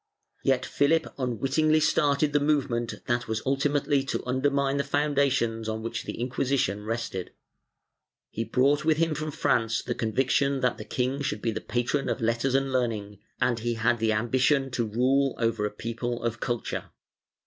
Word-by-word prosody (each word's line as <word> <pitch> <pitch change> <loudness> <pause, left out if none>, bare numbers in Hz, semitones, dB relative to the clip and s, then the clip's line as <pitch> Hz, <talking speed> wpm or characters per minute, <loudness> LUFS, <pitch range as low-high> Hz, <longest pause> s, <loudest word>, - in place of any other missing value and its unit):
Yet 130 -1 +2
Philip 160 +3 +1
unwittingly 135 +5 +2
started 145 -1 +2
the 145 - +4
movement 140 -5 0
that 120 0 -1
was 110 0 -2
ulti 140 +2 +1
mately 145 -1 +1
to - - -2
undermine 140 +2 +1
the 140 - +1
foundations 140 -6 +1
on 110 0 -3
which 115 - -4
the - - -6
Inquisition 125 -4 0
rested. 110 -4 -4 1.0
He 115 - -2
brought 140 +5 +2
with 155 -1 +3
him 165 -1 +2
from 155 +1 -3
France 115 -5 +1
the 120 - -2
conviction 135 +4 +1
that 125 -1 +1
the - - -7
king 130 +3 -1
should 105 -7 -3
be 115 - +1
the - - -4
patron 120 +4 -1
of - - -1
letters 115 +3 0
and 135 0 +1
learning, 105 -5 -1 0.2
and 120 -2 +1
he 120 +1 -1
had 115 +1 +1
the 110 0 +2
ambition 130 +5 +2
to 120 -2 -1
rule 130 +5 +2
over 115 -3 0
a - - -7
people 115 +2 -4
of 115 -1 -2
culture. 120 -1 -3
125 Hz, 170 wpm, -27 LUFS, 115-140 Hz, 1.0 s, the